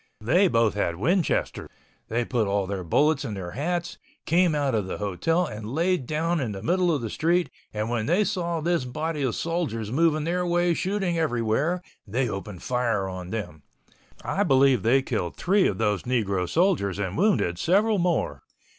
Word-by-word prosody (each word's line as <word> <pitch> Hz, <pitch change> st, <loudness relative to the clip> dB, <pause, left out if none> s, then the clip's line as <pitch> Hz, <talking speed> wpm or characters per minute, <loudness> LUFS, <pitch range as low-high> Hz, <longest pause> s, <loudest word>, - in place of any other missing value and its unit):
They 170 Hz, -, +3 dB
both 115 Hz, -, +2 dB
had 90 Hz, -4 st, -1 dB
Winchesters. 165 Hz, -, 0 dB, 0.4 s
They 115 Hz, +2 st, -1 dB
put 115 Hz, -4 st, 0 dB
all 100 Hz, 0 st, 0 dB
their 95 Hz, -1 st, -4 dB
bullets 150 Hz, -, +2 dB
in 105 Hz, -, -4 dB
their 90 Hz, -3 st, -6 dB
hats, 170 Hz, -, -3 dB, 0.3 s
came 170 Hz, -1 st, +3 dB
out 140 Hz, -3 st, 0 dB
of 105 Hz, -4 st, 0 dB
the -, -, -4 dB
hotel, 135 Hz, -, 0 dB
and 110 Hz, -2 st, -6 dB
laid 170 Hz, -5 st, +1 dB
down 165 Hz, +2 st, 0 dB
in 120 Hz, -7 st, -2 dB
the 95 Hz, -, -7 dB
middle 180 Hz, 0 st, +2 dB
of 145 Hz, -6 st, -1 dB
the 115 Hz, -, -3 dB
street, 175 Hz, +2 st, +1 dB, 0.2 s
and 105 Hz, 0 st, -2 dB
when 115 Hz, -2 st, -1 dB
they 180 Hz, +6 st, +3 dB
saw 170 Hz, -4 st, -2 dB
this 170 Hz, -2 st, +1 dB
body 150 Hz, +4 st, -3 dB
of 130 Hz, -4 st, 0 dB
soldiers 135 Hz, -11 st, -2 dB
moving 155 Hz, +2 st, +2 dB
their 175 Hz, +3 st, 0 dB
way 175 Hz, 0 st, +2 dB
shooting 190 Hz, -1 st, -1 dB
everywhere, 150 Hz, +5 st, 0 dB, 0.2 s
they 125 Hz, +5 st, 0 dB
opened 100 Hz, -3 st, -6 dB
fire 120 Hz, -6 st, 0 dB
on 90 Hz, -1 st, -6 dB
them. 90 Hz, -8 st, -5 dB, 0.6 s
I 195 Hz, -, -1 dB
believe 135 Hz, -, +4 dB
they 130 Hz, +6 st, +3 dB
killed 105 Hz, -10 st, -3 dB
three 195 Hz, +2 st, +3 dB
of 95 Hz, -, -2 dB
those 105 Hz, -2 st, 0 dB
negro 100 Hz, -8 st, -1 dB
soldiers 160 Hz, -, +1 dB
and 95 Hz, -2 st, -3 dB
wounded 170 Hz, -, +1 dB
several 205 Hz, -, +2 dB
more. 170 Hz, -, 0 dB
135 Hz, 180 wpm, -25 LUFS, 105-170 Hz, 0.6 s, believe